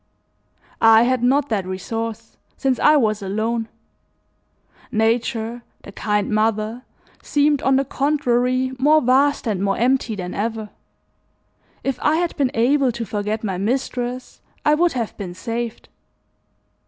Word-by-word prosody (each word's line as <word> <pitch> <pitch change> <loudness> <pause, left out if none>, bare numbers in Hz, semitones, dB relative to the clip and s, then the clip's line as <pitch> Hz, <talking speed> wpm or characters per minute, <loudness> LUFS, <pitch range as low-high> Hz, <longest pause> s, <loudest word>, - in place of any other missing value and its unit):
I 225 0 +7
had 255 0 +1
not 270 +4 +2
that 200 -5 -1
resource 225 +4 -5 0.2
since 265 -2 0
I 300 - +5
was 215 -5 +1
alone: 220 +4 -2 1.2
nature, 230 +1 0 0.2
the - - -10
kind 210 +1 -1
mother, 215 +2 0 0.4
seemed, 290 -1 +2
on 265 0 +3
the 270 +1 +2
contrary, 255 -2 +1
more 300 +4 +5
vast 270 +4 +2
and 200 -4 -1
more 195 0 0
empty 250 -2 +1
than 180 -2 -5
ever. 220 0 -3 1.1
If 270 -2 -2
I 300 - +3
had 345 +1 -1
been 275 -4 +1
able 260 +3 +3
to 235 0 -5
forget 210 +1 -3
my 190 -4 -2
mistress 250 +3 -3 0.2
I 300 - +5
would 340 +3 +2
have 235 -4 -3
been 180 -4 -6
saved. 230 +3 -5
235 Hz, 135 wpm, -21 LUFS, 215-265 Hz, 1.2 s, I